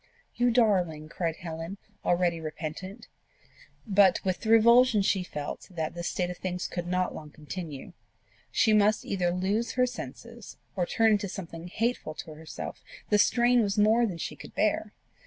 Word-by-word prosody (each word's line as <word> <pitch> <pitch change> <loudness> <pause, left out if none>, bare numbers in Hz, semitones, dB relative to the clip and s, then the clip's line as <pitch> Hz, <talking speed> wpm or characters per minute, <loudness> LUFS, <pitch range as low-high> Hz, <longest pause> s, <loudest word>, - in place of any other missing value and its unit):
"You 245 0 +2
darling!" 185 -10 +2
cried 165 -1 -2
Helen, 165 +3 -6 0.3
already 175 -1 +1
repentant. 165 +8 -6 0.8
But 195 -4 +5
with 185 -1 0
the 220 - -4
revulsion 235 0 +6
she 195 -1 +2
felt 150 -5 -6
that 160 -4 -3
this 170 0 -4
state 180 -1 -1
of 180 - -8
things 180 -1 -3
could 175 -1 -5
not 180 +1 0
long 155 -1 -9
continue 155 +1 -8 0.6
she 220 - +3
must 210 0 +3
either 180 -3 0
lose 195 +6 -1
her 250 0 +3
senses, 235 - -8 0.2
or 180 -3 0
turn 225 -1 +3
into 205 -2 +1
something 170 -2 -7
hateful 225 -5 -2
to 160 -1 -8
herself: 160 +1 -8 0.3
the 210 - +5
strain 240 +3 +4
was 205 -2 -1
more 220 +3 +4
than 180 -5 -5
she - - -5
could - - -12
bear. - - +1
185 Hz, 165 wpm, -28 LUFS, 170-220 Hz, 0.8 s, revulsion